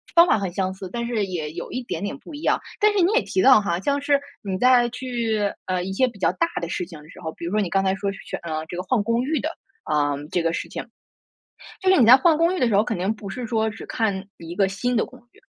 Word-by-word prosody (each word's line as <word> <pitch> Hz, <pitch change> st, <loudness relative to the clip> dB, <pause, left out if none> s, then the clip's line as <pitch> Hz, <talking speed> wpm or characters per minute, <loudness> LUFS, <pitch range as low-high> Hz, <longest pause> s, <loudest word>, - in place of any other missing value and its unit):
方 340 Hz, 0 st, +9 dB
法 220 Hz, -, +3 dB
很 195 Hz, -3 st, -3 dB
相 185 Hz, +1 st, -1 dB
似， 190 Hz, -1 st, -8 dB
但 235 Hz, +2 st, -3 dB
是 230 Hz, -4 st, 0 dB
也 160 Hz, -5 st, -4 dB
有 170 Hz, +2 st, -7 dB
一 255 Hz, 0 st, -3 dB
点 175 Hz, -6 st, -4 dB
点 205 Hz, -, -3 dB
不 300 Hz, -, -13 dB
一 290 Hz, -, -7 dB
样， -, -, +2 dB, 0.2 s
但 425 Hz, 0 st, +5 dB
是 405 Hz, -, +1 dB
你 360 Hz, -, +3 dB
也 480 Hz, -, +4 dB
提 -, -, -2 dB
到 260 Hz, -, +7 dB
哈， 175 Hz, -4 st, -1 dB
像 285 Hz, +3 st, 0 dB
是 285 Hz, 0 st, +3 dB, 0.2 s
你 190 Hz, -2 st, -3 dB
在 245 Hz, 0 st, +5 dB
去， 235 Hz, -3 st, -2 dB, 0.2 s
呃， 180 Hz, -1 st, -1 dB
一 190 Hz, +1 st, -4 dB
些 260 Hz, +5 st, +3 dB
比 235 Hz, -, -9 dB
较 -, -, +2 dB
大 335 Hz, -, +1 dB
的 170 Hz, -, -4 dB
事 180 Hz, -, -2 dB
情 165 Hz, -4 st, -11 dB
的 155 Hz, -, -17 dB
时 -, -, -13 dB
候， 160 Hz, -1 st, -4 dB
比 170 Hz, -, -8 dB
如 170 Hz, -, -3 dB
说 210 Hz, +1 st, +2 dB
你 180 Hz, -, -1 dB
刚 195 Hz, +1 st, +2 dB
才 190 Hz, 0 st, +2 dB
说 200 Hz, 0 st, -2 dB
是 -, -, -9 dB
去 -, -, -5 dB
嗯， 155 Hz, -2 st, -4 dB
这 175 Hz, -, -7 dB
个 180 Hz, -, -2 dB
换 245 Hz, +2 st, +1 dB
公 230 Hz, +3 st, +1 dB
寓 305 Hz, +3 st, 0 dB
的， 315 Hz, -, -2 dB, 0.3 s
啊， 145 Hz, -1 st, +1 dB, 0.2 s
这 175 Hz, -, +1 dB
个 165 Hz, 0 st, +1 dB
事 -, -, -3 dB
情。 -, -, -5 dB, 1.0 s
就 380 Hz, -, +2 dB
是 375 Hz, -, +5 dB
你 235 Hz, -, +6 dB
在 245 Hz, -, +10 dB
换 315 Hz, +2 st, +4 dB
公 340 Hz, +3 st, +2 dB
寓 -, -, -3 dB
的 250 Hz, -, +3 dB
时 220 Hz, -, +1 dB
候， 205 Hz, -, +5 dB
肯 225 Hz, -2 st, -2 dB
定 190 Hz, +4 st, 0 dB
不 210 Hz, -2 st, -9 dB
是 240 Hz, +3 st, -5 dB
说 220 Hz, -1 st, +1 dB
只 220 Hz, 0 st, -6 dB
看 200 Hz, -4 st, -1 dB
一 170 Hz, +1 st, -8 dB
个 195 Hz, 0 st, +3 dB
新 245 Hz, +6 st, -1 dB
的 225 Hz, -, +2 dB
公 -, -, -15 dB
寓， -, -, -23 dB
215 Hz, 320 characters per minute, -23 LUFS, 185-255 Hz, 1.0 s, 在